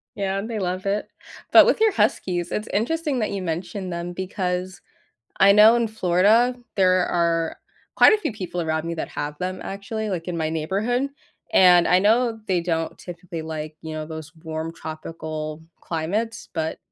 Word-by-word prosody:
Yeah, 195 0 -1
they 225 0 -4
love 185 0 -3
it. 200 +1 -1 0.4
But - - +9
with - - +2
your 440 -1 +4
huskies, 185 - 0
it's 210 - -3
interesting 285 - 0
that 215 - -1
you 195 -2 -3
mentioned 180 +2 -4
them, 170 +1 -4
because 185 0 -3 0.6
I 195 +1 +7
know 210 +3 +8
in 235 -1 +1
Florida, 220 +4 +3 0.2
there 185 -2 +4
are 165 -1 0 0.4
quite - - +7
a 430 - +2
few 310 - -2
people 185 -4 -5
around 160 -1 -1
me 170 0 -3
that 160 - -4
have 150 0 -5
them, 185 0 -3
actually, 205 +2 -4
like, 175 -1 -4
in 175 - -3
my 155 -1 -1
neighborhood, 200 - -1 0.4
and 180 -2 +6
I 180 - +5
know 225 +2 +2
they 180 -2 +1
don't 165 -1 -2
typically, 175 -2 -7
like, 155 -1 -6
you 160 -1 -6
know, 155 0 -4
those 160 -1 -8
warm 160 0 -4
tropical 155 -1 -6 0.2
climates, 205 +8 -3
but 160 -1 -3
180 Hz, 175 wpm, -23 LUFS, 165-210 Hz, 0.6 s, But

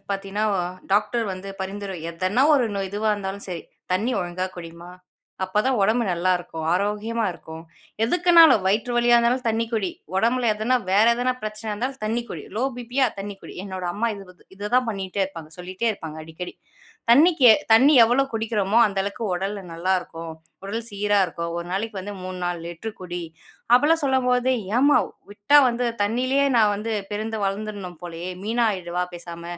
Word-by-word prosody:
பார்த்தீங்கன்னா, 195 +2 -2 0.5
டாக்டர் 210 +3 +2
வந்து 185 +1 -8
பரிந்துரை 195 0 -5
எதனா 185 +8 0
1 260 -5 +3
நோய் 195 -1 -2
இதுவா 210 +2 0
இருந்தாலும் 200 0 -5
சரி, 175 -2 -5 0.3
"தண்ணி 215 +7 +1
ஒழுங்கா 180 +1 -3
குடிமா. 170 0 -9 0.5
அப்ப 185 +3 0
தான் 260 -4 +2
உடம்பு 225 +4 +2
நல்லாருக்கும். 175 -2 -1
ஆரோக்கியமா 210 +4 -1
இருக்கும்." 160 -1 -10 0.4
எதுக்குனாலும், 335 - +6
வயிற்று 220 +5 +1
வலியா 240 0 +5
இருந்தாலும், 240 +1 +1
தண்ணி 225 +1 0
குடி. 205 -5 0 0.3
உடம்பில 235 +3 +2
எதனா 220 +4 +1 0.2
வேற 205 +3 +5
எதனா 250 +1 0
பிரச்சனையா 215 0 -4
இருந்தாலும் 255 +4 -4
தண்ணி 230 +2 -1
குடி. - - -6
Low 240 - +1
BB. 245 +1 -8
யா 260 - +5
தண்ணி 200 0 -6
குடி. - - -10
என்னோட 185 -2 -6
அம்மா 235 +3 0
இதுவுக்கு 180 -2 -15
இதுதான் 230 +5 +1
பண்ணீட்டே 195 -1 -3
இருப்பாங்க. 165 -5 -9
சொல்லீட்டே 185 +6 -2
இருப்பாங்க 160 -6 -8
அடிக்கடி. 160 +3 -8 0.6
"தண்ணிக்கு 290 -2 +6 0.2
தண்ணி 265 +7 +6
எவ்வளவு 270 +4 +1
குடிக்கிறோமோ, 220 -1 +1
அந்த 200 -2 -3
அளவுக்கு 200 +3 -4
உடல் 195 +3 -3 0.2
நல்லா 180 +3 0
இருக்கும். 165 -1 -8 0.3
உடல் 225 +4 -4
சீரா 205 0 +1
இருக்கும். 170 0 -5
ஒரு 170 - -5
நாளைக்கு 210 +2 -3
வந்து 205 +2 -7
3 185 0 -6
4 175 -1 -2
லிட்டர் 190 +6 -7
குடி." 175 -1 -5 0.5
அப்படிலாம் 300 +6 +4
சொல்லும்போது, 255 -2 +2 0.3
"ஏம்மா, 285 +3 +5 0.3
விட்டா 205 +8 +3
வந்து 240 +1 -1 0.2
தண்ணிலயே 255 +6 +1
நான் 215 -2 +4
வந்து 210 +3 -4 0.2
பிறந்து 215 +2 -3
வளர்ந்துடணும் 195 -2 -4
போலயே! 170 0 -6
மீனா 230 +3 +1
ஆயிறவா 180 -2 -3
பேசாம?" 170 -1 -9
205 Hz, 160 wpm, -23 LUFS, 185-235 Hz, 0.6 s, எதுக்குனாலும்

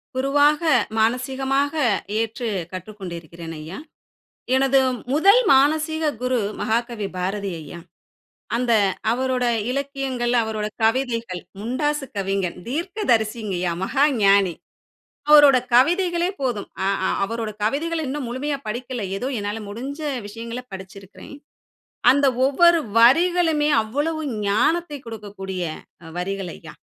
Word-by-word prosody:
குருவாக 290 +4 +3 0.4
மானசீகமாக 265 +5 0 0.5
ஏற்று 230 +2 -2 0.2
கற்றுக்கொண்டு 185 -1 -7
இருக்கிறேன், 165 0 -10
ஐயா. 160 +6 -8 0.8
எனது 270 0 +4 0.3
முதல் 395 - +6
மானசீக 310 +3 +2 0.2
குரு 255 -1 +1 0.2
மகாகவி 225 -1 -1
பாரதி 195 +2 -2
ஐயா. 155 +3 -9 0.8
அந்த 240 -1 +1 0.4
அவரோட 255 0 0 0.3
இலக்கியங்கள், 270 -3 -2
அவரோட 215 -1 -3 0.2
கவிதைகள் 230 -6 0 0.2
முண்டாசு 290 +6 -1
கவிஞன், 195 -2 -1
தீர்க்கதரிசிங்க 240 - -1
ஐயா 175 -2 0
மகா 275 +7 +2 0.2
ஞானி 195 -3 +4 0.8
அவரோட 290 -3 +8 0.2
கவிதைகளே 345 +6 +3
போதும். 240 -6 -2 0.2
அ - - +1 0.2
அ - - 0
அவரோட 225 +1 -3
கவிதைகள் 320 +9 -1
இன்னும் 275 +1 -3
முழுமையா 275 +4 -2
படிக்கல. 245 +2 -4 0.2
ஏதோ 250 - -3
என்னால 205 +1 -3
முடிஞ்ச 270 +8 -6 0.3
விஷயங்களை 230 +3 -7
படிச்சுருக்கிறேன். 190 +6 -11 0.8
அந்த 280 +1 +4 0.2
ஒவ்வொரு 340 +5 +5 0.2
வரிகளுமே 320 +4 +4
அவ்வளவு 295 +8 -2 0.3
ஞானத்தை 310 +8 +1
கொடுக்கக்கூடிய 195 -4 -6 0.5
வரிகள் 195 +1 -3
ஐயா. - - -12
250 Hz, 105 wpm, -22 LUFS, 205-285 Hz, 0.8 s, அவரோட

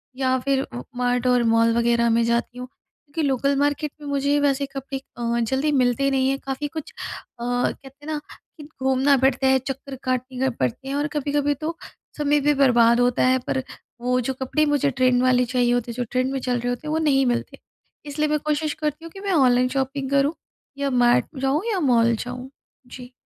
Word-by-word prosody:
या 260 0 +1
फिर 270 +1 +1
उ 120 - -7 0.2
मार्ट 245 0 0
और 245 -1 +3
मॉल 230 0 +4
वगैरह 235 0 +2
में 230 +1 +3
जाती 235 +1 -1
हूँ 250 0 -6
क्योंकि 290 +3 -9
लोकल 275 +1 +1
मार्केट 290 +1 0
में 295 - -8
मुझे 285 +1 +1
वैसे 280 -1 +1
कपड़े 270 0 -6 0.2
अ, 235 0 -1
जल्दी 265 +6 0
मिलते 265 0 +2
नहीं 265 -1 +2
हैं 275 0 -1
काफ़ी 270 +2 -3
कुछ 315 +1 -7
अ, - - -9 0.4
कहते 265 +3 -3
हैं - - -10
ना, 300 - -2 0.4
कि 305 - -10 0.2
घूमना 265 +2 +3
पड़ता 265 0 +2
है, 265 0 +4
चक्कर 270 +1 -6
काटने 255 +1 -1
पड़ते 135 - -3
हैं, 275 - -2
और 290 +1 0
कभी-कभी 290 0 0
तो 315 +4 -5 0.4
समय 295 0 +2
भी 295 +1 +2
बर्बाद 240 -4 +4
होता 245 0 +2
है। 260 0 +3
पर 265 - -1 0.4
वो 250 +1 +1
जो 265 +2 -2
कपड़े 305 +4 +1
मुझे 290 -1 +1
ट्रेंड 255 -1 +2
वाले 250 -1 +3
चाहिए 245 0 +1
होते 245 -1 -1
जो 245 - -2
ट्रेंड 255 +1 0
में 270 - -2
चल 250 -1 -1
रहे 245 +1 -2
होते 245 +5 -4
हैं, - - -2
वो - - +1
नहीं 275 -4 +3
मिलते। 240 -1 -2 0.5
इसलिए 300 +1 -1
मैं 300 0 +1
कोशिश 300 0 -1
करती 305 +1 -4
हूँ, 330 - -9
कि 390 - -11
मैं 395 0 -3
ऑनलाइन 255 -5 +4
शॉपिंग 270 0 -2
करूँ 280 +2 +2 0.4
या 280 0 -1
मार्ट 240 0 +4 0.2
जाऊँ 270 +3 +1
या 390 - 0
मॉल 235 -6 +3
जाऊँ। 250 +3 -6 0.4
जी। 250 0 -11
265 Hz, 205 wpm, -23 LUFS, 245-285 Hz, 0.5 s, मॉल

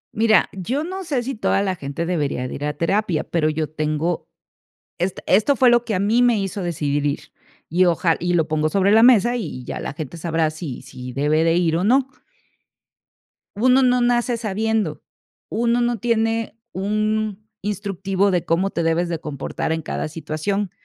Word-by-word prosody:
Mira, 220 0 +4
yo 245 - -2
no 375 +3 -5
sé 280 -8 -1
si 270 +2 -3
toda 205 -3 +1
la 190 -2 -1
gente 145 +1 -4
debería 145 -7 -1
de - - -7
ir 145 - -4
a 150 0 -3
terapia, 175 -1 0
pero 155 -2 0
yo 155 0 -1
tengo 155 +2 -2 0.7
esta 180 +2 -2
esto 215 +9 +4
fue 250 -1 +5
lo 240 0 +3
que 225 - -2
a 185 - 0
mí 220 +5 +2
me 240 -3 +3
hizo 195 0 -3
decidir 145 -4 -1
ir, 145 -1 0 0.5
y 180 +3 +3
oja 170 -1 +2
y 175 0 0
lo 160 -3 +2
pongo 155 0 +1
sobre 195 +3 +2
la 220 +2 +6
mesa, 240 -1 +5
y 165 - -5
ya - - -5
la - - -5
gente 155 +2 -7
sabrá 165 -1 0
si 155 -6 -7
si 125 -1 -9
debe 150 +4 +2
de 165 0 +3
ir 165 -2 +2
o 180 - -1
no. 260 +5 +3 1.5
Uno 255 +5 +4
no 250 0 +3
nace 240 0 +1
sabiendo. 215 -5 -1 0.5
Uno 235 +1 +1
no 240 -2 0
tiene 225 -1 0
un 215 +1 -1 0.2
instructivo 195 -1 -1
de 175 -2 0
cómo 185 +4 +1
te 170 - -2
debes 170 +2 +1
de 165 -2 -2
comportar 150 +1 -4
en 160 -1 -2
cada - - -3
situación. 165 +6 -3
190 Hz, 185 wpm, -21 LUFS, 160-225 Hz, 1.5 s, la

